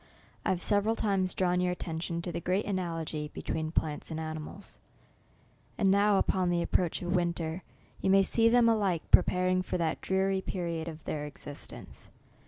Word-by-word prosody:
I -, -, -1 dB
hare 185 Hz, -, +2 dB
several 205 Hz, +4 st, +2 dB
times 195 Hz, -5 st, 0 dB
drawn 180 Hz, -1 st, +1 dB
vour 180 Hz, 0 st, +1 dB
attention 170 Hz, -1 st, -3 dB
to 175 Hz, -, -3 dB
the -, -, -3 dB
great 185 Hz, +5 st, 0 dB
analogy 165 Hz, -5 st, -3 dB
between 160 Hz, -1 st, -3 dB
plants 150 Hz, -2 st, -1 dB
a:id 160 Hz, -1 st, -4 dB
animals, 155 Hz, +4 st, -7 dB, 1.0 s
and 195 Hz, -3 st, +3 dB
now, 200 Hz, +1 st, +4 dB
upon 185 Hz, -2 st, +1 dB
the 175 Hz, -1 st, +1 dB
approach 175 Hz, 0 st, 0 dB
of 175 Hz, +1 st, 0 dB
winter, 170 Hz, -1 st, -1 dB, 0.4 s
you -, -, +1 dB
may 195 Hz, 0 st, +6 dB
see 230 Hz, +3 st, +3 dB
them 240 Hz, 0 st, +5 dB
alike 200 Hz, -7 st, +2 dB
preparing 185 Hz, 0 st, +4 dB
for 185 Hz, -, -2 dB
that 165 Hz, -2 st, -1 dB
dreary 190 Hz, 0 st, +1 dB
period 170 Hz, -3 st, -3 dB
of 160 Hz, -1 st, -8 dB
their 150 Hz, -1 st, -3 dB
existence. 145 Hz, 0 st, -8 dB
180 Hz, 170 wpm, -30 LUFS, 165-195 Hz, 1.0 s, may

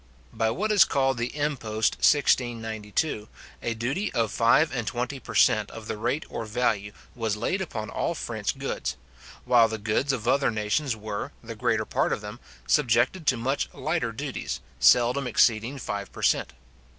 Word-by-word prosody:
By 110 Hz, 0 st, +1 dB
what 210 Hz, -, -1 dB
is 205 Hz, -2 st, +7 dB
called 135 Hz, -3 st, +1 dB
the 120 Hz, +5 st, -3 dB
impost 115 Hz, -7 st, 0 dB
1692, 115 Hz, -3 st, +1 dB, 0.3 s
a 115 Hz, -, -2 dB
duty 135 Hz, -, -2 dB
of 115 Hz, -3 st, +1 dB
five 120 Hz, +7 st, +4 dB
and 120 Hz, -4 st, -3 dB
twenty 125 Hz, +3 st, -3 dB
per -, -, -9 dB
cent. 110 Hz, -1 st, +4 dB
of 115 Hz, -1 st, -9 dB
the -, -, -3 dB
rate 120 Hz, +7 st, -2 dB
or 115 Hz, -, -5 dB
value, 110 Hz, -3 st, 0 dB, 0.2 s
was 110 Hz, -3 st, -2 dB
laid 180 Hz, -, -1 dB
upon 110 Hz, -12 st, -5 dB
all -, -, -1 dB
French -, -, -3 dB
goods; -, -, -3 dB, 0.5 s
while 120 Hz, -2 st, +5 dB
the 110 Hz, 0 st, -4 dB
goods 110 Hz, +6 st, 0 dB
of 120 Hz, -4 st, -3 dB
other 140 Hz, +2 st, +3 dB
nations 110 Hz, +5 st, 0 dB
were, 105 Hz, -1 st, -5 dB
the -, -, -6 dB
greater -, -, 0 dB
part -, -, 0 dB
of -, -, -1 dB
them, 105 Hz, +3 st, -8 dB, 0.3 s
subjected 130 Hz, +4 st, +2 dB
to 130 Hz, -, +4 dB
much 130 Hz, +4 st, -1 dB
lighter 155 Hz, -4 st, -1 dB
duties, 135 Hz, +3 st, -4 dB, 0.2 s
seldom 125 Hz, +2 st, +4 dB
exceeding 120 Hz, +2 st, +2 dB
five 100 Hz, -5 st, -5 dB
per -, -, -9 dB
cent. -, -, +2 dB
120 Hz, 170 wpm, -26 LUFS, 110-135 Hz, 0.5 s, is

